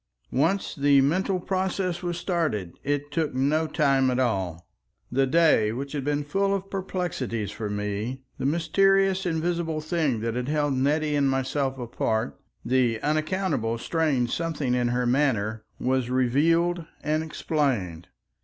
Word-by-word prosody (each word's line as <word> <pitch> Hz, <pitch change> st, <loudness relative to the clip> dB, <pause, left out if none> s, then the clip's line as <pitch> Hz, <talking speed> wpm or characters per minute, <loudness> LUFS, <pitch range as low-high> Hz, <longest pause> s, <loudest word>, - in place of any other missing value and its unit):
Once 165 Hz, +9 st, +1 dB
the 140 Hz, -1 st, +4 dB
mental 185 Hz, +7 st, +1 dB
process 185 Hz, -1 st, -1 dB
was 175 Hz, -1 st, -3 dB
started 160 Hz, -, -1 dB
it 145 Hz, +1 st, -2 dB
took 150 Hz, -3 st, -1 dB
no 150 Hz, +5 st, +2 dB
time 135 Hz, -4 st, +2 dB
at 125 Hz, -, 0 dB
all. 95 Hz, -9 st, -1 dB, 0.4 s
The 135 Hz, +2 st, +2 dB
day 145 Hz, -8 st, +4 dB
which 135 Hz, +4 st, -5 dB
had 145 Hz, -3 st, -3 dB
been 145 Hz, +1 st, 0 dB
full 195 Hz, +7 st, +1 dB
of 195 Hz, 0 st, -5 dB
perplexities 175 Hz, -, -3 dB
for 110 Hz, 0 st, -5 dB
me, 105 Hz, +5 st, -3 dB, 0.2 s
the -, -, 0 dB
mysterious 190 Hz, +4 st, +2 dB
invisible 165 Hz, -1 st, -1 dB
thing 155 Hz, -7 st, 0 dB
that 115 Hz, 0 st, -1 dB
had 125 Hz, +1 st, -3 dB
held 145 Hz, -1 st, +1 dB
Nettie 150 Hz, +3 st, +1 dB
and 140 Hz, -1 st, +3 dB
myself 135 Hz, 0 st, -1 dB
apart, 115 Hz, -1 st, -2 dB, 0.3 s
the 125 Hz, -3 st, +2 dB
unaccountable 155 Hz, -, 0 dB
strange 135 Hz, -3 st, 0 dB
something 155 Hz, -6 st, -1 dB
in 125 Hz, -1 st, +1 dB
her 125 Hz, +1 st, 0 dB
manner, 110 Hz, -5 st, +1 dB
was 130 Hz, -1 st, 0 dB
revealed 165 Hz, +8 st, +2 dB, 0.2 s
and 155 Hz, +1 st, +1 dB
explained. 130 Hz, -, -1 dB
145 Hz, 145 wpm, -26 LUFS, 125-165 Hz, 0.4 s, the